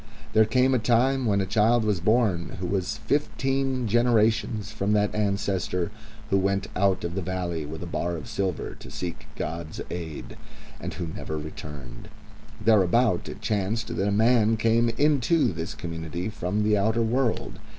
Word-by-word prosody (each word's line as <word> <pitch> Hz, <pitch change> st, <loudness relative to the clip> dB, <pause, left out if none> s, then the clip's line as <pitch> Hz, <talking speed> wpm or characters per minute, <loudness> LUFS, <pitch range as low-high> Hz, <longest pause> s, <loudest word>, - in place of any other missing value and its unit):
There 110 Hz, 0 st, +6 dB
came 130 Hz, +4 st, +3 dB
a 130 Hz, -, +3 dB
time 125 Hz, +3 st, +2 dB
when 100 Hz, -2 st, +2 dB
a -, -, 0 dB
child 110 Hz, +3 st, +3 dB
was 105 Hz, -4 st, +1 dB
born 105 Hz, -3 st, +1 dB
who 90 Hz, -, -3 dB
was 100 Hz, +3 st, -1 dB
fifteen 135 Hz, -2 st, 0 dB
generations 110 Hz, -2 st, +2 dB
from 100 Hz, +2 st, 0 dB
that 105 Hz, -1 st, +2 dB
ancestor 100 Hz, -3 st, -1 dB, 0.4 s
who 95 Hz, -, +4 dB
went 100 Hz, +1 st, 0 dB
out 95 Hz, 0 st, +2 dB
of 85 Hz, 0 st, -3 dB
the 95 Hz, -, -2 dB
valley 85 Hz, -4 st, -3 dB
with 80 Hz, +3 st, -6 dB
a -, -, -5 dB
bar 85 Hz, 0 st, -2 dB
of 100 Hz, -, -8 dB
silver 100 Hz, -4 st, -2 dB
to -, -, -10 dB
seek 90 Hz, -2 st, -6 dB
God's 80 Hz, 0 st, -5 dB
aid, 85 Hz, -3 st, -6 dB, 0.4 s
and -, -, -4 dB
who 85 Hz, -, -3 dB
never 80 Hz, -1 st, -5 dB
returned. 75 Hz, -5 st, -8 dB, 0.5 s
Thereabouts 110 Hz, -1 st, +3 dB
it -, -, -8 dB
chanced 110 Hz, +2 st, -1 dB
that 95 Hz, -, 0 dB
a -, -, +1 dB
man 110 Hz, +1 st, +4 dB
came 115 Hz, +1 st, +3 dB
into 145 Hz, -, +2 dB
this 80 Hz, +6 st, -5 dB
community 85 Hz, -1 st, -4 dB
from 105 Hz, 0 st, -1 dB
the 105 Hz, 0 st, +3 dB
outer 110 Hz, +3 st, +2 dB
world. 120 Hz, +1 st, 0 dB
105 Hz, 165 wpm, -26 LUFS, 90-115 Hz, 0.5 s, There